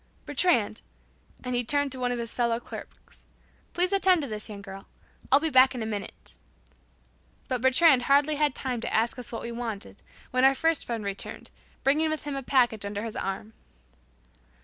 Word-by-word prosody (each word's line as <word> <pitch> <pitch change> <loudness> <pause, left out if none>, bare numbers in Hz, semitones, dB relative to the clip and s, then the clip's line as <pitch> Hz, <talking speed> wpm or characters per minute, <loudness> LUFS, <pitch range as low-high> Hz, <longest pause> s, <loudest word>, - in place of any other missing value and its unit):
"Bertrand," 270 - +1 0.6
and 250 0 -3
he 245 0 +1
turned 285 +3 +1
to 260 - -6
one 250 -1 0
of 245 - -2
his 235 -1 -2
fellow 235 -1 0
clerks, - - -11 0.5
"please 360 +2 +1
attend 375 -4 +4
to - - -4
this 215 -1 -5
young 200 -1 -8
girl. 195 0 -10 0.4
I'll 275 - +7
be 320 +1 -2
back 260 0 +6
in 240 - -3
a - - -3
minute." 210 -2 -7 1.1
But 255 -2 -2
"Bertrand" 260 +1 +5
hardly 290 +2 +3
had 295 -3 +1
time 250 -3 -3
to - - -4
ask 230 +3 +1
us 245 - -8
what 230 - -5
we 235 - -5
wanted, 230 -4 -6 0.3
when 255 0 +1
our 270 +1 +6
first 325 +2 +1
friend 230 -3 -3
returned, 200 0 -5 0.3
bringing 305 +4 +3
with 310 0 -3
him 290 -1 -4
a 275 - -3
package 245 -5 +2
under 205 +1 -4
his 225 -2 -5
arm. 195 +3 -4
250 Hz, 190 wpm, -27 LUFS, 225-285 Hz, 1.1 s, I'll